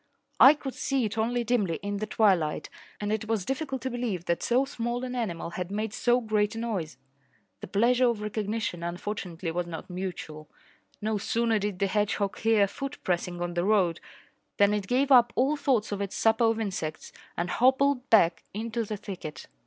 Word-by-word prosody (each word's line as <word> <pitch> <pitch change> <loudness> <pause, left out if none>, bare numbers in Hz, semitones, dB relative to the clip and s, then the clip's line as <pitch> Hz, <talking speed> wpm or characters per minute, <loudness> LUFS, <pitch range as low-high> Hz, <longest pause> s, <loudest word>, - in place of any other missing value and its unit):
I 275 +3 +9
could 270 -3 -6
see 270 -4 0
it 215 - -3
only 235 +2 0
dimly 210 -8 +1
in 205 0 -2
the 215 +1 -3
twilight, 190 -8 +1 0.3
and 210 0 -1
it 220 0 -2
was 220 -4 -1
difficult 270 -1 -3
to 260 - -1
believe 230 -8 -3
that 170 - 0
so 250 +3 +2
small 240 -1 -3
an 250 -1 -4
animal 185 -9 -3
had 180 0 -4
made 210 +1 -3
so 245 +2 +2
great 215 -2 0
a - - -5
noise. 195 - -3 0.6
The - - -8
pleasure 240 +6 +3
of 235 -3 -1
recognition, 210 -3 -3
unfortunately, 175 -1 -4
was 175 +1 -2
not 170 +2 -7
mutual. 175 -5 -6 0.5
No 215 -1 0
sooner 230 +1 +1
did 205 -2 -2
the 200 - +1
hedgehog 200 0 0
hear 225 -2 +4
a - - +3
foot 275 +7 -6
pressing 175 -1 -1
on 175 0 -3
the 175 0 0
road 190 -5 +2 0.6
than 200 0 +4
it 205 -2 -2
gave 265 +3 +1
up 240 -2 +6
all 270 +4 +2
thoughts 255 -8 +1
of 200 -1 -2
its 200 -1 -4
supper 225 +1 +3
of 225 0 +2
insects 185 -8 -4 0.3
and 175 +1 -1
hobbled 265 +2 +2
back 170 -7 +5
into 230 +2 -2
the 215 -1 -4
thicket. 190 -7 -7
215 Hz, 190 wpm, -28 LUFS, 185-240 Hz, 0.6 s, I